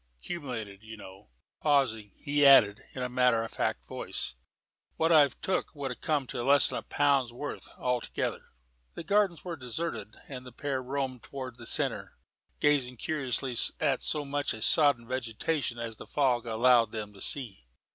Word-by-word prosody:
'Cumulated, 115 - -6
you 110 0 -10
know." 95 -4 -13 0.3
Pausing, 130 -8 +1
he 145 0 0
added, 115 -7 +7
in 130 - -4
a - - -1
matter 125 -2 +2
of 115 - -7
fact - - -2
voice, 65 - -4 0.6
"What 165 +1 +1
I've 145 -5 +5
took 185 -3 -1
would 135 -4 -5
come 150 -4 0
to 120 - -5
less'n 140 +3 +4
a - - -2
pound's 140 -4 +1
worth, 145 +5 -7
altogether." 125 -1 -2 0.5
The - - -6
Gardens 200 -4 +1
were 175 -2 -4
deserted, 125 -5 -4
and 130 -2 -7
the 125 - -11
pair 135 +1 -3
roamed 130 -1 -3
towards 130 -2 -8
the - - -8
centre, - - 0 0.4
gazing 135 -4 +2
curiously 135 -3 -2 0.2
at 140 -4 +1
so 150 -2 0
much 145 -3 -1
of 110 - -3
sodden 140 -6 +4
vegetation 130 +2 -2
as 115 -2 -5
the - - -11
fog 125 -4 +1
allowed 115 0 +4
them 105 -2 -6
to 100 - -14
see. 110 - 0
130 Hz, 165 wpm, -29 LUFS, 115-145 Hz, 0.6 s, added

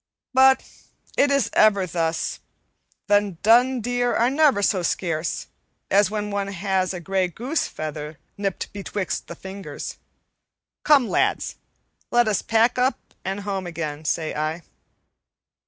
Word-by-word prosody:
But 265 +1 +6 0.5
it 285 - +4
is 280 -5 +1
ever 200 -3 +4
thus: 165 -2 -2 0.7
the 205 -3 +2
dun 245 +3 +5
deer 245 +1 0
are 240 +2 +3
never 280 -8 +3
so 190 -2 +2
scarce 165 -2 -2 0.5
as 200 0 +5
when 210 -1 -3
one 200 -1 -1
has 190 -1 -1
a 180 - -5
gray 190 +2 0
goose 245 - -2
feather 150 0 -6 0.2
nipped 195 -2 -3
betwixt 200 -2 -4
the 170 - -8
fingers. 190 +3 -7 0.8
Come, 280 -5 +5
lads, - - 0 0.5
let 240 -1 +3
us 210 -3 +1
pack 230 +2 +2
up 255 +2 -1
and 195 +2 -3
home 195 -2 -3
again, 155 -3 -5
say 155 0 -1
I." 155 +3 -2
200 Hz, 135 wpm, -23 LUFS, 175-235 Hz, 0.8 s, But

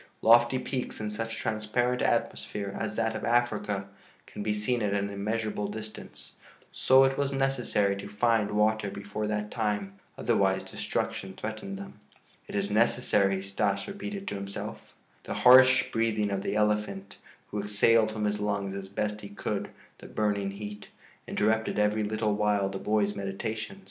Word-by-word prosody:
Lofty 120 +2 +6
peaks 130 0 -4
in 105 -1 -3
such 115 +1 -4
transparent 110 +3 0
atmosphere 100 -1 -1
as 105 -1 -3
that 115 0 0
of 110 - -5
Africa 110 -5 +1 0.4
can - - -8
be 105 +1 0
seen 105 +4 0
at 100 -1 0
an 100 0 -1
immeasurable 105 +1 -2
distance; 110 +1 -9 0.3
so 130 +1 +5
it 135 +1 +1
was 140 -1 +1
necessary 135 -7 +1
to 100 - -7
find 110 0 +2
water 105 0 +2
before 100 +2 -4
that 105 0 -2
time. 105 -3 -2 0.2
Otherwise 95 -1 +2
destruction 95 0 -3
threatened 110 - -5
them. 195 - -10 0.5
"It - - -7
is 100 0 0
necessary," 105 -3 +2
Stas 100 0 -1
repeated 200 0 -6
to - - -4
himself. 100 0 -7 0.3
The - - -4
harsh 130 +1 +7
breathing 110 -2 +1
of 100 -1 -1
the - - -2
elephant, 105 -2 0 0.3
who 105 - -2
exhaled 110 +2 +3
from 110 -1 -2
his 105 0 0
lungs 100 -2 -1
as 100 -1 -6
best 105 +2 -3
he 100 - -8
could 100 - -3 0.3
the - - -11
burning 100 -2 0
heat, 105 0 -7 0.4
interrupted 110 +1 +1
every 105 +1 +2
little 110 0 0
while 105 -1 +1
the 95 0 -5
boy's 105 -1 +1
meditations. 110 - -4
105 Hz, 160 wpm, -29 LUFS, 100-115 Hz, 0.5 s, harsh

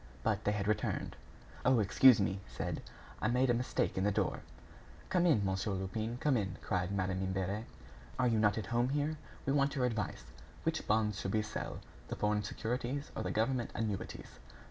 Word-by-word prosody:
But - - 0
they 105 - +3
had 100 -1 -1
returned. 105 - -1 0.5
"Oh! 130 0 +5
excuse 110 +3 +7
me," 95 - +2
he 95 - -5
said, - - -4 0.4
"I - - +2
made 125 +2 +3
a - - +4
mistake 120 -5 0
in - - +1
the 105 - +3
door." - - 0 0.7
"Come 180 -1 +3
in, 110 -12 +4
Monsieur 95 +2 0
Lupin, 110 +5 -2
come 140 +1 +2
in," 100 -4 -1
cried 90 -1 0
Madame 95 -1 0
Imbert, 95 +3 -1 0.5
"are 125 - +3
you 115 -2 +2
not 105 0 +3
at 110 - -2
home 120 +2 +3
here? 150 +2 0 0.3
We 135 - +2
want 140 0 +2
your 130 -2 +2
advice. 110 - -2 0.4
What - - 0
bonds 105 -1 +2
should 95 - -2
we 110 - +2
sell? 105 - -5 0.3
The - - -4
foreign 105 0 +1
securities 125 +6 -3
or - - -2
the - - -2
government 120 +2 +1
annuities?" 105 -3 -4
110 Hz, 190 wpm, -34 LUFS, 100-125 Hz, 0.7 s, excuse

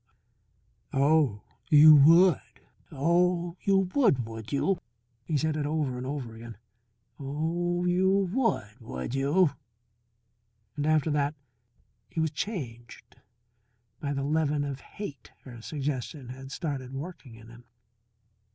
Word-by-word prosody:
"Oh, 140 -6 +2 0.3
you 155 +1 +9
would! 165 +3 +6 0.5
Oh, 175 +3 +1
you 195 -1 +2
would, 200 - +3
would 110 0 -8
you?" 175 +6 +1 0.5
He 155 - 0
said 155 +1 0
it 150 -2 -1
over 150 -4 -1
and 125 +1 -5
over 135 -5 -5
again. 115 -1 -10 0.6
"Oh, 170 +5 -2
you 180 +1 +2 0.2
would, 200 - -1
would 90 - -6
you?" 145 +5 +3 1.2
And 145 0 -2
after 155 0 +2
that 145 0 0 0.7
he - - -5
was 160 -1 +1
changed 135 - -6 0.8
by 145 - -3
the 140 0 -2
leaven 150 0 0
of 140 -2 -4
hate 145 - -9
her 120 -3 -11
suggestion 140 -1 -4
had 135 +1 -9
started 135 -5 -4
working 140 -5 -8
in 115 0 -14
him. 120 +1 -15
145 Hz, 125 wpm, -28 LUFS, 130-165 Hz, 1.2 s, you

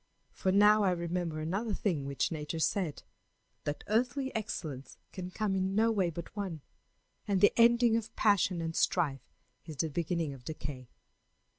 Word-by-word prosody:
For 190 - 0
now 210 +2 +6
I 195 - +4
remember 170 -2 -2
another 195 +7 -2
thing 155 -9 -1
which 140 +4 -1
Nature 155 0 -4
said 160 -1 -1 0.6
that 145 - -3
earthly 250 +5 0
excellence 155 -11 -5
can 185 -1 -6
come 200 +1 -1
in 190 0 0
no 225 +2 +4
way 195 -5 +1
but 170 +3 -8
one, 190 -7 -4 0.7
and 200 -2 +2
the 205 - +5
ending 235 0 +5
of 225 -1 -3
passion 190 -4 +2
and 165 0 -3
strife 145 -7 0 0.4
is 155 - -7
the 160 +3 -1
beginning 165 -1 -1
of 130 -2 -12
decay. 135 -5 -7
180 Hz, 160 wpm, -31 LUFS, 155-210 Hz, 0.7 s, now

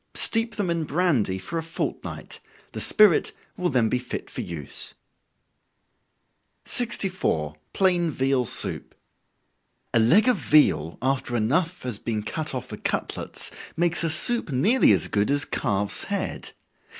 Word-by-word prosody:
Steep 225 -1 +2
them 195 -5 -1
in 170 -1 -1
brandy 145 - +1
for 165 - -4
a - - -2
fortnight, 165 +1 -5 0.3
the - - -5
spirit 210 -6 +4 0.2
will 180 -1 -1
then 125 -5 +2
be 125 +3 0
fit 125 - -7
for - - -4
use. 80 -5 -4 1.7
64. 185 - -1 0.2
Plain 180 -3 +2
Veal 135 -3 0
Soup. - - -1 1.0
A - - +4
leg 175 - +4
of 250 - +4
veal, 85 - +3
after 130 -2 -1
enough 160 +11 0
has 120 -5 -4
been 110 -3 -3
cut 155 +4 -3
off 130 -1 -4
for 105 - -7
cutlets, - - -2 0.3
makes 175 0 +1
a 165 - +1
soup 200 +7 +3
nearly 190 - +4
as - - +3
good 105 0 0
as 145 +1 +2
calf's 100 -2 -1
head. 200 -1 -4
150 Hz, 140 wpm, -25 LUFS, 115-180 Hz, 1.7 s, spirit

